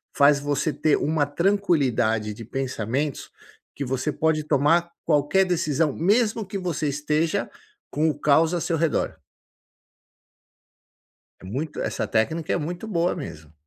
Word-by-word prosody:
faz 140 Hz, 0 st, +5 dB
você 145 Hz, +2 st, -1 dB
ter 155 Hz, -, +2 dB
uma 155 Hz, -1 st, +1 dB
tranquilidade 145 Hz, -, +1 dB
de 115 Hz, +2 st, -10 dB
pensamentos 135 Hz, +3 st, -3 dB, 0.5 s
que 140 Hz, -, -4 dB
você 130 Hz, +3 st, -1 dB
pode 155 Hz, +1 st, +1 dB
tomar 160 Hz, +4 st, +3 dB
qualquer 150 Hz, +5 st, +3 dB
decisão 160 Hz, -4 st, +1 dB
mesmo 215 Hz, +4 st, +1 dB
que 195 Hz, +1 st, -5 dB
você 175 Hz, -5 st, -2 dB
esteja 150 Hz, +3 st, 0 dB, 0.4 s
com 155 Hz, +2 st, +1 dB
o 150 Hz, -, -2 dB
caos 160 Hz, +3 st, +3 dB
ao 175 Hz, -, -1 dB
seu 165 Hz, -, 0 dB
redor. 160 Hz, -1 st, 0 dB, 2.3 s
É -, -, -15 dB
muito 140 Hz, +11 st, -4 dB
essa -, -, -2 dB
técnica 155 Hz, +9 st, 0 dB
é -, -, +2 dB
muito 175 Hz, +6 st, -4 dB
boa 175 Hz, -3 st, +1 dB
mesmo. 80 Hz, -2 st, -8 dB
150 Hz, 135 wpm, -24 LUFS, 140-170 Hz, 2.3 s, faz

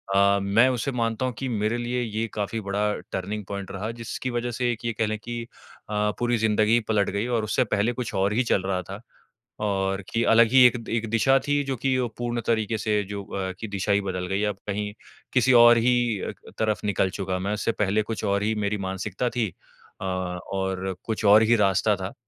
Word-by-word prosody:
अ, 100 Hz, 0 st, +4 dB
मैं 105 Hz, +6 st, +4 dB
उसे 125 Hz, +2 st, -1 dB
मानता 115 Hz, 0 st, -1 dB
हूँ 125 Hz, -, -2 dB
कि 135 Hz, -, -3 dB
मेरे 110 Hz, +1 st, 0 dB
लिए 120 Hz, +1 st, -2 dB
ये 115 Hz, -1 st, -2 dB
काफ़ी 105 Hz, +2 st, -2 dB
बड़ा 105 Hz, +1 st, 0 dB, 0.2 s
टर्निंग 100 Hz, +2 st, -4 dB
पॉइंट 100 Hz, -1 st, -6 dB
रहा 105 Hz, +4 st, -4 dB
जिसकी 125 Hz, +2 st, -4 dB
वज़ह 120 Hz, 0 st, -2 dB
से 120 Hz, +1 st, 0 dB
एक 120 Hz, 0 st, -6 dB
ये 115 Hz, -, 0 dB
कह 110 Hz, -, 0 dB
लें 110 Hz, 0 st, -2 dB
कि 120 Hz, 0 st, -5 dB, 0.5 s
अ, 105 Hz, 0 st, +1 dB
पूरी 120 Hz, -1 st, +1 dB
ज़िन्दगी 110 Hz, +1 st, +3 dB
पलट 105 Hz, -3 st, +2 dB
गई 100 Hz, +4 st, -2 dB
और 120 Hz, -3 st, 0 dB
उससे 110 Hz, +4 st, +1 dB
पहले 105 Hz, +4 st, +1 dB
कुछ 125 Hz, -2 st, -5 dB
और 100 Hz, +2 st, +1 dB
ही 125 Hz, +3 st, +2 dB
चल 95 Hz, -, +2 dB
रहा 95 Hz, -1 st, -1 dB
था। 95 Hz, +4 st, -9 dB, 0.6 s
और 95 Hz, -1 st, 0 dB
कि 115 Hz, 0 st, 0 dB
अलग 115 Hz, 0 st, +7 dB
ही 130 Hz, 0 st, +7 dB
एक 125 Hz, -, +6 dB
एक 115 Hz, -1 st, -1 dB
दिशा 135 Hz, +4 st, +4 dB
थी 145 Hz, 0 st, +2 dB
जो 135 Hz, -, -1 dB
कि 130 Hz, +2 st, +1 dB
वो 125 Hz, -, 0 dB
पूर्ण 120 Hz, -1 st, -2 dB
तरीके 110 Hz, -1 st, +1 dB
से 105 Hz, -1 st, 0 dB
जो 100 Hz, -1 st, -5 dB
अ, 95 Hz, -1 st, -3 dB
कि 110 Hz, -, -5 dB
दिशा 100 Hz, 0 st, -2 dB
ही 100 Hz, -, +3 dB
बदल 90 Hz, -2 st, -3 dB
गई। 95 Hz, +3 st, -1 dB
अब 95 Hz, -, -11 dB
कहीं 105 Hz, 0 st, -3 dB, 0.4 s
किसी 130 Hz, 0 st, +4 dB
और 120 Hz, 0 st, +8 dB
ही 120 Hz, -3 st, +2 dB
अ, -, -, -3 dB, 0.2 s
क -, -, -11 dB
तरफ 110 Hz, -1 st, 0 dB
निकल 95 Hz, -2 st, +1 dB
चुका 95 Hz, -1 st, -2 dB
मैं, 100 Hz, +3 st, -2 dB
उससे 105 Hz, +2 st, 0 dB
पहले 105 Hz, 0 st, +1 dB
कुछ 110 Hz, +1 st, -5 dB
और 100 Hz, 0 st, +1 dB
ही 110 Hz, -, +1 dB
मेरी 105 Hz, +1 st, 0 dB
मानसिकता 95 Hz, +5 st, -2 dB
थी 115 Hz, -3 st, +2 dB, 0.5 s
अ, 95 Hz, -, -3 dB
और 95 Hz, +1 st, -3 dB
कुछ 110 Hz, -1 st, -2 dB
और 105 Hz, +2 st, +8 dB
ही 120 Hz, +2 st, +4 dB
रास्ता 100 Hz, +2 st, +2 dB
था। 95 Hz, 0 st, -6 dB
105 Hz, 225 wpm, -25 LUFS, 100-120 Hz, 0.6 s, और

